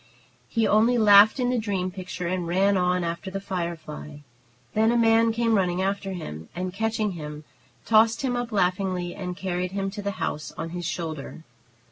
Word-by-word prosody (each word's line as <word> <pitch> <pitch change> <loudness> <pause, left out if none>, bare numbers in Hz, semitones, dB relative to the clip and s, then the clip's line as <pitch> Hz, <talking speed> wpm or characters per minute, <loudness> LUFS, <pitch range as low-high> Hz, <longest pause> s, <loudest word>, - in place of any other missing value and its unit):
He 230 -2 +1
only 225 +4 +4
laughed 210 +2 +7
in 250 -1 +1
the 250 - +1
dream 195 -4 -2
picture 180 -1 -6
and 175 0 -2
ran 195 +3 +2
on 180 -1 +1
after 170 +3 -4
the 195 +1 -4
firefly. 165 -5 -5 0.5
Then 220 +1 +3
a 240 - +2
man 225 0 +4
came 230 0 +1
running 180 -3 +1
after 195 0 -1
him, 80 - -7
and, 180 +1 -3
catching 220 0 -1
him, 150 -3 -7 0.4
tossed 225 +2 +4
him 250 -2 0
up 245 0 -3
laughingly, 180 -2 0
and 180 -2 -6
carried 180 -1 -3
him 195 -1 -2
to 205 +1 -6
the 200 0 -3
house 150 - -3
on 165 +1 -4
his 175 -1 -4
shoulder. 160 -2 -5
190 Hz, 180 wpm, -25 LUFS, 175-220 Hz, 0.5 s, laughed